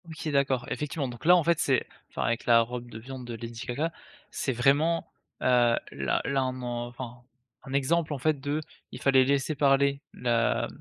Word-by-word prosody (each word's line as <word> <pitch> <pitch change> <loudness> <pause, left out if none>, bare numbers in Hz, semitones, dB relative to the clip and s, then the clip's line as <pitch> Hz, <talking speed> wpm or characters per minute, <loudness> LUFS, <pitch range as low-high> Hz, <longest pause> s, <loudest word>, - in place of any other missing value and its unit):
OK. 160 -1 -5
D'accord. 135 -3 +1
Effectivement 150 -1 -2
donc 120 +1 -9
là, 175 +2 +8
en 175 - +3
fait, 170 +1 +2
c'est 135 -5 +2 0.2
enfin - - -3
avec 115 0 -1
la 115 -1 +6
robe 120 +1 -5
de 110 - -9
viande 130 +2 -8
de 120 -1 -6
Lady 115 +1 -7
Gaga 145 +7 -1 0.4
c'est 135 - -2
vraiment, 145 +7 +2 0.3
heu, - - -3 0.5
là - - -1
là 135 -1 +1
on 130 0 -4
en 120 -1 -3
enfin, 120 0 -8 0.4
un 135 - -8
exemple 150 +3 +1
en - - -3
fait 150 +2 +1
de, 145 +3 -2 0.3
il - - -9
fallait 135 -1 +5
laisser 140 +3 +1
parler 140 0 +3
la 120 -2 +1
135 Hz, 195 wpm, -28 LUFS, 120-145 Hz, 0.5 s, là